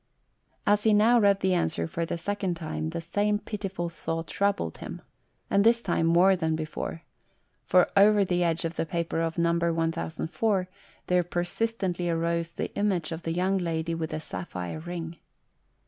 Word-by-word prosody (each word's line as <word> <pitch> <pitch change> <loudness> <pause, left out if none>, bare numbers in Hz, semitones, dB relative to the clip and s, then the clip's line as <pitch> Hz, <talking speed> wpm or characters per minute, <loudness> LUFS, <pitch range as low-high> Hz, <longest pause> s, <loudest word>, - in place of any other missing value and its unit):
As 205 0 +4
he 215 0 +4
now 230 +3 +5
read 200 -2 +4
the 190 0 +2
answer 85 - 0
for 165 - -3
the - - -2
second 195 +1 -2
time, 160 -1 -4
the 170 +1 -4
same 205 +5 0
pitiful 195 -5 -4
thought 165 0 -4
troubled 200 - -1
him, - - -7 0.4
and 200 - +3
this 235 +1 +4
time 170 -3 +1
more 180 +3 +5
than 160 -3 0
before; 160 +1 -5 0.6
for 180 -1 +4
over 205 0 +6
the 180 -1 +1
edge 165 -1 0
of 165 0 -4
the - - 0
paper 170 -1 -1
of 165 0 -2
No. 170 0 +3
1004 170 - 0 0.4
there 180 0 +3
persistently 175 +1 -2
arose 170 0 0
the - - -4
image 190 -6 0
of 165 +1 -4
the 165 - -3
young 190 +2 +1
lady 165 -1 -2
with 165 -1 -3
the - - -3
sapphire 95 - -5
ring. 170 0 -6
170 Hz, 170 wpm, -27 LUFS, 165-195 Hz, 0.6 s, over